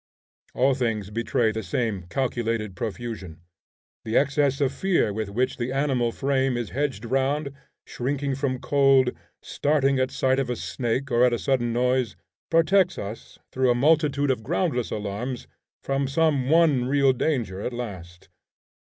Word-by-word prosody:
All 135 +2 +3
things 110 -6 -2
betray 115 0 +1
the 110 +1 -4
same 100 -1 -2
calculated 115 -5 -2
profusion. 105 -6 -6 0.6
The 110 - 0
excess 140 -1 +2
of 140 -2 +1
fear 175 - +1
with 110 -1 -3
which 125 +6 -1
the 120 +1 -3
animal 135 -4 +1
frame 135 -1 0
is 120 -3 -4
hedged 135 -5 -2
round, 140 +3 0 0.3
shrinking 140 +2 -2
from 130 -1 -1
cold, 135 -1 +3 0.3
starting 140 -2 +1
at 130 0 +1
sight 130 0 +1
of 135 -2 -1
a 125 - -1
snake, 130 +3 -3
or 120 +1 +4
at 125 -1 +4
a - - +1
sudden 125 -2 0
noise, 125 -1 +1 0.3
protects 175 +3 +3
us, 100 +3 -7
through 130 -1 +1
a 120 - +4
multitude 145 0 +2
of 125 - -2
groundless 110 +4 -1
alarms, 105 +5 -4 0.4
from 135 0 -1
some 140 -2 +1
one 155 -6 +4
real 135 0 +3
danger 120 -9 -1
at 125 - -3
last. 95 -8 -7
130 Hz, 155 wpm, -25 LUFS, 115-140 Hz, 0.6 s, or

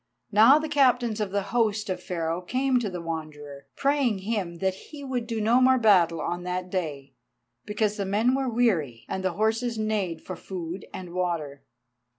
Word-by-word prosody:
Now 225 +7 +7
the 310 0 -2
Captains 250 -6 +2
of 210 - -1
the 200 +1 -1
host 215 -3 +1
of 185 - -3
Pharaoh 165 -1 -2
came 255 +6 +1
to 220 -4 -2
the 180 -2 -6
Wanderer, 150 -4 -7
praying 275 -6 +1
him 200 -6 -2
that 190 +2 0 0.2
he 295 -2 -9
would 250 -4 -3
do 225 -1 -2
no 230 +4 +3
more 260 0 +5
battle 180 -8 +4
on 175 +3 -3
that 180 0 -4
day, 145 -7 -4 0.5
because 210 0 0
the 200 - -2
men 215 +6 +2
were 265 -1 0
weary, 180 - 0
and 190 - -4
the 185 -2 0
horses 225 +4 0
neighed 210 -6 -2
for 185 - -6
food 175 0 -6
and 180 -2 -8
water. 170 -6 -2
200 Hz, 180 wpm, -26 LUFS, 170-235 Hz, 0.5 s, Now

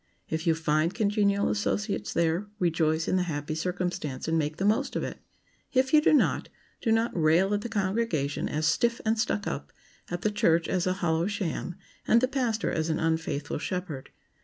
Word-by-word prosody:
If 160 +2 -2
you 165 - +4
find 160 +2 +1
congenial 205 -2 +2
associates 210 0 -1
there, 170 +4 +1
rejoice 165 -3 +1
in 185 - +2
the - - +2
happy 145 0 -3
circumstance 175 -5 -3
and 165 - +1
make 155 0 0
the 190 - -1
most 220 +7 +1
of - - -1
it. - - -5 0.5
If 260 +1 +2
you 305 - +7
do - - +4
not, 300 - +2 0.3
do 225 - +1
not 225 +1 +1
rail 170 +4 +3
at 205 - 0
the 235 - -5
congregation 195 - -1
as 155 +1 -1
"stiff 235 +8 +2
and 220 0 +1
stuck 210 -2 0
up," - - -4 0.4
at 175 0 -4
the 215 - +2
church 170 -5 +2
as 185 -1 0
a 185 - +2
hollow 165 +1 +1
sham, 190 -4 -3 0.3
and 230 - +6
the 255 - +2
pastor 245 -5 -1
as 160 0 -1
an 160 - +1
unfaithful 160 -3 -1
shepherd. 175 -5 -4
180 Hz, 190 wpm, -28 LUFS, 160-215 Hz, 0.5 s, you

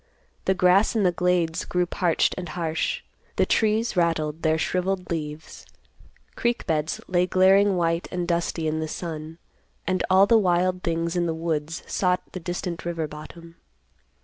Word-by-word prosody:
The 190 - +2
grass 185 +5 +4
in 215 - +2
the 180 - +4
glades 175 -2 0
grew 180 0 0
parched 175 -1 +1
and 180 -3 -6
harsh; 165 -2 -2 0.3
the - - +3
trees 220 +1 +1
rattled 165 -3 0
their 160 0 +2
shriveled 180 +2 -1
leaves; 155 -1 -5 0.7
creek 240 0 -1
beds 155 -2 -1
lay 180 0 +2
glaring 190 +2 +4
white 165 0 0
and 180 -1 -2
dusty 170 -2 -1
in 155 0 -1
the 160 - -2
sun; 160 -1 -6 0.5
and 185 -1 0
all 190 +1 +6
the 225 +2 +5
wild 180 -1 +1
things 165 0 -1
in 175 -1 +1
the 165 - -1
woods 160 -1 -3
sought 180 -1 0
the 185 - -6
distant 175 0 -4
river 165 -2 -2
bottom. 165 +3 -11
175 Hz, 160 wpm, -25 LUFS, 165-185 Hz, 0.7 s, all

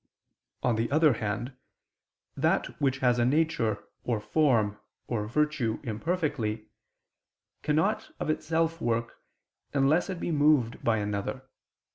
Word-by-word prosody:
On 120 -3 +2
the 115 +1 0
other 155 0 +4
hand, 110 +4 -3 0.8
that - - 0
which 135 -2 +2
has 125 0 +4
a - - +4
nature, 125 -6 +1 0.2
or 120 -3 0
form, 105 -2 +2 0.3
or 105 -3 -2
virtue 140 -3 0
imperfectly, 120 - -2 1.0
cannot 190 - +1
of - - -2
itself 165 +1 0
work, 115 0 -1 0.6
unless 145 +7 +3
it 185 -3 -4
be - - -2
moved 145 -6 +3
by 115 -1 +2
another. 105 +5 -3
125 Hz, 120 wpm, -28 LUFS, 110-155 Hz, 1.0 s, other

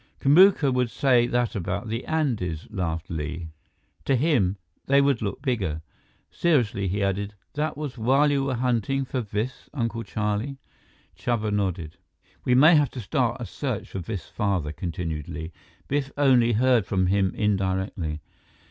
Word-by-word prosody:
"Kamuka 150 -1 +5
would 125 -2 +1
say 125 -2 +3
that 120 -1 0
about 100 +2 -3
the 115 +3 -3
Andes," 110 - -1
laughed 85 -5 -3
Li. 80 +1 -4 0.6
"To 135 - +3
him, 120 - +2 0.3
they 140 +1 +5
would 140 -3 +2
look 105 +5 -4
bigger." 95 - -1 0.5
Seriously, 120 - +1
he 100 +3 -1
added, 100 +2 -1 0.2
"That 150 +1 -2
was 145 -5 -5
while 135 +6 +3
you 140 -1 +1
were 130 -2 -1
hunting 125 +2 0
for 130 0 -2
Biff's 110 +3 -4
Uncle 115 -3 -2
Charlie?" 105 +5 -2 0.6
Chuba 110 -3 -1
nodded. 90 -6 -2 0.5
"We 125 - +3
may 155 +6 +7
have 145 -3 +4
to 130 - -6
start 120 +1 -1
a - - -3
search 130 -7 -4
for 95 - -4
Biff's 95 +1 -5
father," 95 -8 -1
continued 80 -2 -4
Li. 80 0 -6 0.4
"Biff 140 -1 -1
only 125 -5 +4
heard 120 -2 +3
from 95 -2 +1
him 95 0 +2
indirectly." 95 -6 -1
115 Hz, 155 wpm, -25 LUFS, 95-130 Hz, 0.6 s, may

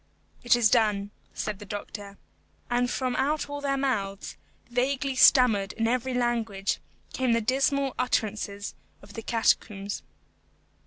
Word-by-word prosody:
"It 240 0 +5
is 230 -3 +3
done," 210 -4 +2 0.2
said 210 -2 -3
the - - -8
doctor. 205 0 -7 0.5
And 245 0 +2
from 255 0 -1
out 295 +4 0
all 285 0 -5
their 275 -1 0
mouths, 205 -8 -2 0.3
vaguely 265 +3 0
stammered 225 -7 +5
in 225 0 0
every 250 +2 0
language, 225 -5 0 0.3
came 255 -2 +1
the 230 - +3
dismal 270 +3 +1
utterances 210 -4 -1 0.3
of 200 +1 -14
the 225 - -6
catacombs. 210 -3 0
235 Hz, 135 wpm, -27 LUFS, 205-260 Hz, 0.5 s, It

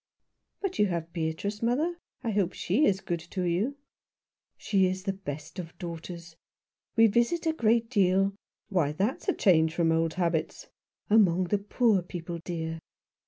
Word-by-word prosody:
"But 390 -2 -3
you 210 - +5
have 170 -2 -3
Beatrice, 170 +5 -3
mother. 300 +9 0 0.2
I 230 - -1
hope 195 -4 +1
she 235 - +1
is 190 -5 +2
good 175 -2 -2
to 185 - -2
you." 195 +11 0 0.4
" - - -65 0.3
She 190 -2 +2
is 185 0 -3
the 195 -1 -1
best 160 -2 -7
of 165 -2 -8
daughters. 170 -1 -7 0.6
We 225 - +7
visit 235 +10 +2
a 320 - +2
great 230 -4 +2
deal 195 -3 +3
" - - -65
" - - -53
Why, 165 -7 +1
that's 200 - -1
a - - +3
change 160 -4 +3
from 165 -2 +2
old 165 0 +1
habits." 170 -3 -1 0.4
"Among 185 -5 +5
the 205 - +2
poor 210 0 +2
people, 175 -1 -6
dear. 165 -1 -4
185 Hz, 170 wpm, -28 LUFS, 170-215 Hz, 0.6 s, We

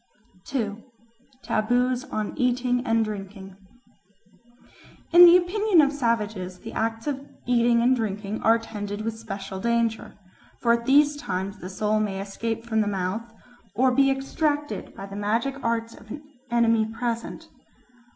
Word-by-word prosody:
2. 225 -5 -3 0.6
Taboos 245 +3 +1
on 215 -1 -4
Eating 250 -1 +1
and 225 0 +2
Drinking 195 -2 -7 1.6
IN 350 +1 +11
THE 350 +1 +9
OPINION 375 +1 +2
of 285 -1 +4
savages 215 -8 -1
the 225 +4 -9
acts 225 0 -2
of 275 -2 -3 0.2
eating 235 -1 +3
and 255 +2 +4
drinking 210 -2 -3
are 225 - +5
attended 210 -2 -5
with 225 0 -3
special 195 -3 -6
danger; 235 0 -1 0.4
for 235 -1 +3
at 235 0 -2
these 290 +2 +5
times 195 -6 -4
the 180 - -7
soul 210 +3 0
may 200 -2 -2
escape 225 +3 -4
from 220 -2 +1
the 210 - 0
mouth, 200 +4 -3 0.4
or 260 +1 +3
be 275 +2 +4
extracted 290 +2 -2
by 195 - -7
the 200 0 -9
magic 230 +7 -1
arts 230 0 -1
of 215 - -16
an 295 +6 -7 0.3
enemy 230 -2 +3
present. 230 +1 -4
230 Hz, 145 wpm, -25 LUFS, 210-250 Hz, 1.6 s, IN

